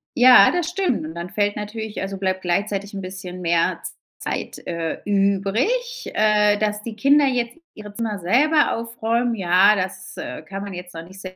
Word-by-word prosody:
Ja, 245 -5 +8
das 350 -2 -1
stimmt. 355 - -1
Und 160 +2 -8
dann 170 +1 -6
fällt 205 -1 0
natürlich 210 0 -5
also 195 0 -4
bleibt 190 -1 -1
gleichzeitig 200 +3 -1
'n 195 - -5
bisschen 185 -1 -8
mehr 170 -1 +1
Z - - -7 0.2
Zeit, - - -4
äh, 170 -2 -3
übrig, 205 - 0
äh, 210 -1 +3
dass 210 0 -1
die 225 -1 -7
Kinder 280 +5 +4
jetzt 245 0 -1 0.2
ihre 210 -1 -10
Zimmer 215 -2 -3
selber 280 - +3
aufräumen. 230 +1 -1
Ja, 190 +1 +4
das, 185 -1 -5
äh, - - -7
kann 195 0 -7
man 200 -2 -7
jetzt 180 0 -9
noch 165 - -7
nicht 190 +3 -13
s 185 0 -8
205 Hz, 185 wpm, -22 LUFS, 185-230 Hz, 0.2 s, Ja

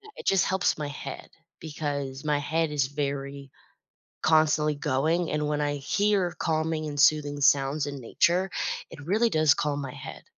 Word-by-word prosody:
it - - -10
just 195 -1 +4
helps 190 -1 +1
my 150 -1 -3
head 145 - -8 0.3
because 145 -3 -4
my 150 -1 +1
head 160 +2 -1
is 140 -3 +1
very 140 -1 -4 0.7
constantly 155 -1 +3
going 155 +4 0
and 150 0 -1
when 150 0 0
I 145 0 -1
hear 195 +5 +1
calming 160 -1 -1
and 145 -1 -3
soothing 145 -1 +3
sounds 140 +1 +3
in 140 -1 -6
nature, 180 +10 +1 0.4
it - - -10
really 220 +6 +2
does 155 -4 +4
calm 145 -1 -1
my 135 -3 -6
head. - - -9
150 Hz, 160 wpm, -27 LUFS, 145-160 Hz, 0.7 s, just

